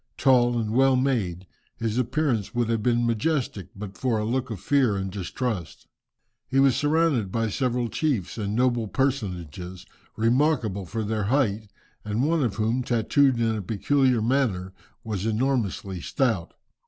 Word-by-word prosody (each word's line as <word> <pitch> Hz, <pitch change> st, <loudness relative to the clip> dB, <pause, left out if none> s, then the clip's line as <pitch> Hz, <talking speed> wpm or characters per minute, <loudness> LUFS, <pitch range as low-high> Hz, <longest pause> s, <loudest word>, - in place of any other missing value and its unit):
Tall 120 Hz, -3 st, +4 dB
and 110 Hz, -2 st, -1 dB
well 135 Hz, +3 st, +4 dB
made, 110 Hz, -9 st, 0 dB, 0.3 s
his 115 Hz, +1 st, -1 dB
appearance 120 Hz, -5 st, -1 dB
would 120 Hz, -1 st, +1 dB
have 115 Hz, -1 st, 0 dB
been 120 Hz, +1 st, +2 dB
majestic, 115 Hz, -, -1 dB
but 100 Hz, -1 st, -8 dB
for 125 Hz, -4 st, +1 dB
a 105 Hz, -, -1 dB
look 130 Hz, +3 st, -1 dB
of 110 Hz, -5 st, -5 dB
fear 125 Hz, -1 st, +2 dB
and 95 Hz, 0 st, -3 dB
distrust. 100 Hz, -, -4 dB, 0.6 s
He 135 Hz, +1 st, +1 dB
was 135 Hz, -2 st, +5 dB
surrounded 150 Hz, -, +1 dB
by 115 Hz, 0 st, 0 dB
several 125 Hz, +1 st, 0 dB
chiefs 115 Hz, -, -2 dB
and 105 Hz, 0 st, -2 dB
noble 120 Hz, -2 st, +1 dB
personages, 95 Hz, -, -3 dB, 0.3 s
remarkable 115 Hz, -, +1 dB
for 110 Hz, +5 st, -3 dB
their 105 Hz, -1 st, -1 dB
height, 110 Hz, -4 st, 0 dB, 0.3 s
and 105 Hz, +4 st, -1 dB
one 165 Hz, +1 st, +2 dB
of 115 Hz, -5 st, -1 dB
whom, 115 Hz, +4 st, 0 dB
tattooed 125 Hz, +2 st, +2 dB
in 115 Hz, -1 st, +1 dB
a 105 Hz, -, -3 dB
peculiar 125 Hz, +4 st, +1 dB
manner, 110 Hz, -8 st, 0 dB, 0.3 s
was 105 Hz, -2 st, -3 dB
enormously 110 Hz, -6 st, -1 dB
stout. 115 Hz, -, -1 dB
115 Hz, 155 wpm, -25 LUFS, 105-130 Hz, 0.6 s, was